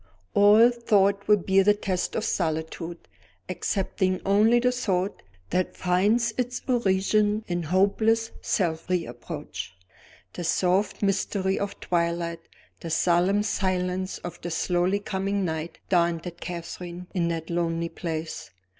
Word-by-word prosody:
All 210 +4 +7
thought 200 -4 +2
will 210 0 +6
bear 195 +1 +3
the 205 +1 +4
test 190 -3 -2
of 220 - -1
solitude, 165 0 -2 0.5
excepting 190 -1 -1
only 215 +4 +4
the 250 +1 +2
thought 200 -6 -1 0.3
that 185 0 -1
finds 210 +6 +2
its 245 0 -1
origin 210 -2 +2
in 175 0 -1
hopeless 205 +7 +2
self 165 -3 -1
reproach. 120 - -4 0.6
The 175 - -5
soft 185 +5 +1
mystery 195 -1 0
of 200 - -4
twilight, 170 -1 -1 0.4
the 165 - -6
solemn 180 +5 +2
silence 185 -2 -1
of 175 - -8
the 175 - -4
slowly 180 +3 +1
coming 200 -1 -2
night, 160 0 -4
daunted 170 -1 0
Catherine 175 0 -6
in 175 -3 +1
that 165 0 -3
lonely 170 -1 -1
place. 160 -2 -5
185 Hz, 125 wpm, -26 LUFS, 170-205 Hz, 0.6 s, All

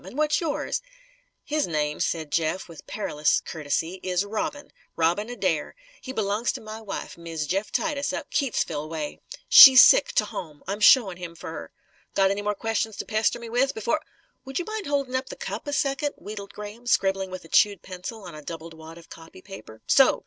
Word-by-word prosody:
And 255 - -10
what's 305 +2 +2
yours?" 315 -4 -2 0.6
"His 305 0 -1
name," 150 -2 -1
said 160 -3 -2
Jeff 165 +3 -1
with 165 -3 -13
perilous 150 -8 0
courtesy, 160 +3 -3
"is 185 +1 0
Robin 220 +7 -4 0.2
Robin 175 +7 +1
Adair. 185 -10 -2 0.3
He 260 - -7
b'longs 215 -1 0
to - - -6
my 215 0 -8
wife, 205 -4 -7
Miz 165 -2 -4
Jeff 195 +7 -2
Titus 295 -3 -1
up - - -6
Keytesville 160 - -1
way. 155 -2 -5 0.3
She's 270 - +11
sick, - - +6
to - - +2
home. 155 -5 -8
I'm 200 +2 -3
showin' 205 -3 +6
him 175 -2 -8
fer - - -8
her. - - -8 0.4
Got 195 -1 +4
any 200 +1 -2
more 210 0 -1
questions 225 0 -2
to - - -4
pester 220 +1 +1
me 235 -1 -9
with, 250 +4 +1
b'fore 235 +8 0 0.2
" - - -42
"Would 270 0 -5
you 355 - -2
mind 435 -4 -5
holding 275 -3 -1
up 260 0 -2
the - - -7
cup, - - -6
a - - -2
second?" 285 0 0
wheedled 205 -1 -8
Graham, 210 +3 -9
scribbling 195 -4 +1
with 185 -2 -8
a - - -12
chewed 200 +1 +3
pencil 190 +4 -8
on 175 -3 -9
a 155 - -9
doubled 165 +1 -8
wad 160 +1 -12
of 170 - -15
copy 160 - -13
paper. 110 +2 -12
"So! - - +5
200 Hz, 200 wpm, -25 LUFS, 165-245 Hz, 0.6 s, She's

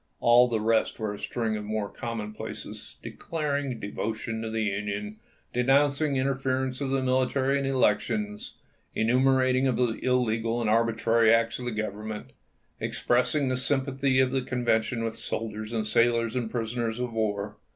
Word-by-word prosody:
All 120 +1 +6
the 115 -2 0
rest 110 +1 +1
was 105 -2 -3
a - - -12
string 115 -3 -1
of 105 - -5
mere 105 0 -2
commonplaces 110 -1 -7
declaring 145 -6 -3
devotion 110 +2 -4
to 115 - -3
the 110 0 -1
Union, 105 +1 -3 0.4
denouncing 140 +3 +3
interference 130 0 -1
of 135 - -1
the 135 0 0
military 130 +2 +1
in 140 - -1
elections, 105 -4 0 0.4
enumerating 130 +2 +3
the 125 -3 +1
illegal 115 -2 +1
and 110 -2 +1
arbitrary 115 0 +3
acts 115 +1 +2
of 125 - -6
the 125 - -2
Government, 110 0 -5 0.5
expressing 130 +4 +1
the 130 - 0
sympathy 135 0 +1
of 130 -1 +3
the 135 0 +1
Convention 120 -2 0
with 115 0 -3
soldiers 110 -1 -4
and 110 -2 -1
sailors 115 0 +2
and 120 -3 -1
prisoners 115 0 -2
of 125 -1 -3
war. 105 -2 -2
115 Hz, 150 wpm, -27 LUFS, 110-130 Hz, 0.5 s, All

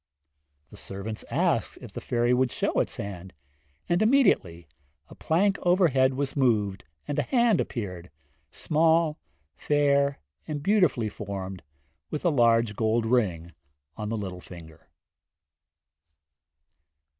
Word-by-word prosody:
The 105 - -12
servants 100 +3 -7
asked - - 0
if - - -11
the - - -6
fairy 120 0 +1
would 130 0 +2
show - - 0
its - - -1
hand, 95 -2 -7 0.5
and 175 +3 +1
immediately 200 - +2 0.4
a - - -12
plank 195 +5 +1
overhead 155 -8 +3
was 140 0 -2
moved 110 -8 +1 0.2
and 145 - -1
a - - +4
hand 235 -6 +2
appeared, 90 -7 -6 0.4
small, 160 0 +1 0.4
fair 140 - +2 0.3
and 145 -2 -4
beautifully 180 - +2
formed, 95 -3 -6 0.5
with 150 - -5
a - - +5
large 115 -4 +3
gold 110 +1 +1
ring 95 -9 0 0.4
on 105 -1 -5
the 115 - -2
little 95 -3 -6
finger. 80 -4 -13
120 Hz, 120 wpm, -26 LUFS, 100-155 Hz, 0.5 s, a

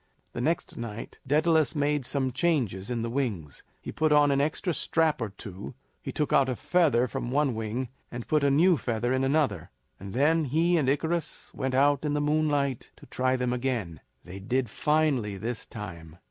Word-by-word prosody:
The - - -4
next 160 +5 -1
night 115 -1 -7
Daedalus 155 +2 +3
made 145 -3 0
some 135 -2 0
changes 120 - 0
in 120 -2 -2
the 115 - -2
wings. 105 - -3 0.2
He - - -5
put 155 -1 +1
on 145 -1 +5
an 140 0 +2
extra 155 +4 -1
strap 160 -3 +1
or 115 - -2
two; 100 0 -9 0.3
he - - -5
took 150 - -1
out 135 -1 +4
a 130 - -1
feather 145 -4 +2
from 120 +1 -4
one 140 0 +1
wing, 110 +3 -3 0.2
and 120 -1 -7
put 155 -2 +2
a 140 - +4
new 165 +5 +4
feather 120 0 -1
into 130 0 +1
another; 135 - 0 0.3
and 100 +3 -8
then 155 +4 +3
he 165 +6 +2
and 145 -6 +2
Icarus 160 +4 -2
went 130 0 -2
out 140 +1 +3
in 150 -1 0
the - - +1
moonlight 145 -3 0
to - - -15
try 130 0 0
them 125 -1 -1
again. 120 - -2 0.3
They 90 +2 -8
did 120 +2 -1
finely 145 -10 +1
this 115 +4 -4
time. 85 -7 -9
130 Hz, 190 wpm, -27 LUFS, 115-150 Hz, 0.3 s, on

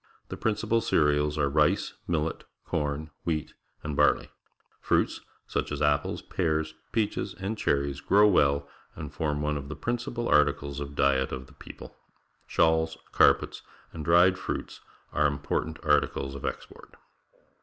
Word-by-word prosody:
The - - -4
principal 110 +1 0
cereals 75 -6 +2
are 70 -2 +2
rice, 75 +2 +2
millet, 80 -1 -1 0.2
corn, 75 +1 -2
wheat, 80 -3 -2 0.3
and 75 -1 -3
barley. - - +3 0.5
Fruits, - - +1 0.2
such - - -2
as - - -3
apples, 75 -1 +1
pears, 80 0 -1 0.2
peaches, 110 -2 -1
and 95 +4 -3
cherries, 70 -7 0
grow 100 +7 +5
well 70 -7 +3 0.3
and 75 -2 -7
form 75 -2 -1
one 75 0 0
of 70 0 -7
the 80 - -5
principal 120 +6 -3
articles 70 -1 +2
of 70 0 -6
diet 65 -2 +2
of 65 0 -5
the - - -19
people. - - -12 0.5
Shawls, 80 0 +2
carpets, - - +3 0.3
and 80 - -6
dried 90 +3 +5
fruits - - -5 0.3
are 75 0 +3
important 75 +2 -2
articles 70 -2 +1
of 70 - -7
export. - - -8
75 Hz, 145 wpm, -28 LUFS, 70-85 Hz, 0.5 s, grow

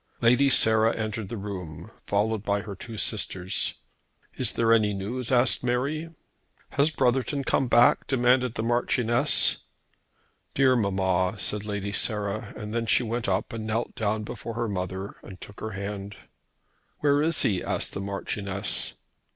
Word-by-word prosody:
Lady 125 +4 +4
Sarah 110 -2 +4
entered 110 -2 -4
the 115 - -5
room, 90 -3 -7 0.2
followed 105 +1 +1
by 100 -1 0
her 100 -1 -7
two 115 +3 -8
sisters. 95 -4 -1 0.6
"Is 125 -4 +1
there 115 0 +3
any 105 -3 +3
news?" 115 +6 -4
asked 125 0 +3
Mary. 140 +7 -1 0.6
"Has 140 +2 +3
Brotherton 135 0 0
come 135 - +1
back?" 120 0 +4
demanded 125 -1 +2
the 110 - -2
Marchioness. 120 +3 +2 1.0
"Dear 130 -1 +4
mamma!" 95 -3 +1
said 105 +1 -1
Lady 100 -1 -3
Sarah; 105 -1 -1
and 115 +2 -3
she - - +4
went 115 -1 -2
up 95 +4 -1
and 110 -1 -5
knelt 115 +2 -2
down 110 0 -1
before 115 +2 -7
her 120 0 -1
mother 95 0 -4
and 95 -2 -11
took 100 - -11
her 110 -1 -5
hand. 100 0 -5 0.9
"Where 145 0 +3
is 160 +1 +3
he?" 95 -4 +1
asked - - -2
the - - -4
Marchioness. 100 0 -2
110 Hz, 150 wpm, -26 LUFS, 100-120 Hz, 1.0 s, Lady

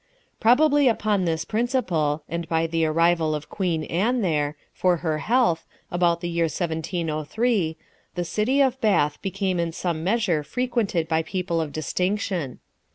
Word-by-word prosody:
Probably 285 +4 +5
upon 210 -5 +1
this 160 -1 -1
principle, 180 - 0
and 170 -1 -4
by 165 0 +1
the 165 0 0
arrival 165 0 +2
of 150 0 -7
Queen 175 -5 -1
Anne 225 +11 0
there, 150 -4 0 0.2
for 180 -1 +2
her 155 -1 0
health, 230 -8 +1 0.2
about 175 -1 +2
the 175 - -2
year 170 -1 +1
1703, 165 - -1
l 160 - -10 0.4
the 175 -1 -2
city 215 +11 +1
of 265 -1 +1
Bath 150 -9 +2
became 195 -2 -1
in 170 -1 0
some 165 -1 -3
measure 190 -5 +1
frequented 230 - -1
by 160 0 +1
people 175 -1 -2
of 155 -2 -4
distinction. 180 -2 -2
175 Hz, 155 wpm, -24 LUFS, 160-210 Hz, 0.4 s, Probably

